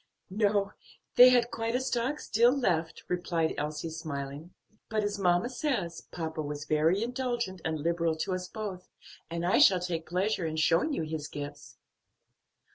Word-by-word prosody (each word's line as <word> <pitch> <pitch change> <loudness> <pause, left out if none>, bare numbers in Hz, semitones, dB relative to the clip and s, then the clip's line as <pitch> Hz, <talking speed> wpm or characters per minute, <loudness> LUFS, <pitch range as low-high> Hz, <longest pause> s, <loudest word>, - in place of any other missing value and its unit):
"No, 205 0 +1 0.4
they 250 +1 +10
had 245 -1 +3
quite 230 +1 -2
a - - +2
stock 260 +2 -1
still 240 +5 +3
left," 165 -10 0
replied 170 -2 0
Elsie, 150 +2 -3
smiling; 150 0 -6 0.4
"but, 215 -1 0
as 205 0 -2
mamma 175 +2 +3
says, 240 - -3
papa 160 -2 -4
was 145 0 -5
very 160 +7 +2
indulgent 240 -6 -2
and 160 -1 -2
liberal 170 0 +1
to 170 +4 -2
us 185 0 -3
both; 195 -4 -6 0.4
and 170 +1 -3
I 180 - +3
shall 185 -2 +7
take 170 -2 -4
pleasure 185 0 0
in 155 - -3
showing 165 - +2
you 275 - -1
his 155 -1 -4
gifts." 145 0 -8
180 Hz, 160 wpm, -29 LUFS, 160-220 Hz, 0.4 s, they